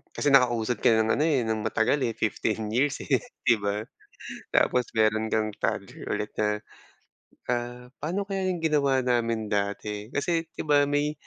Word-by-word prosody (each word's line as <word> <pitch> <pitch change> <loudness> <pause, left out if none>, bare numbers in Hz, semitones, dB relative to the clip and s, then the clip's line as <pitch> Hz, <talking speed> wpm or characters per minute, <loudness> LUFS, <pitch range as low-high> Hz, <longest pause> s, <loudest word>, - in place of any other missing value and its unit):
kasi 145 - +1
nakausad 120 -4 +3
ka - - +4
ng 110 0 +3
ano, 150 - +1
eh, 140 -6 +2
ng 110 -1 -1
matagal, 110 +5 +1
eh, 115 -3 -1
15 110 0 -1
years, 135 +5 +1
eh, - - +2 0.3
di 115 -3 +4
ba? 100 +1 -2 0.7
Tapos 125 -1 +3
meron 110 0 +2
kang 110 -1 0
tag - - -1 0.2
ulit 105 - -3
na, 105 0 +1 0.9
ah, 120 0 -3
paano 185 +6 -2
kaya 195 -2 -1
yung 180 -2 -2
ginawa 145 -4 +2
namin 115 -3 +1
dati? 105 +1 -2
Kasi 165 +3 0
di 165 - -7
ba 145 -1 +4
may 145 +1 +1
120 Hz, 165 wpm, -27 LUFS, 110-145 Hz, 0.9 s, ka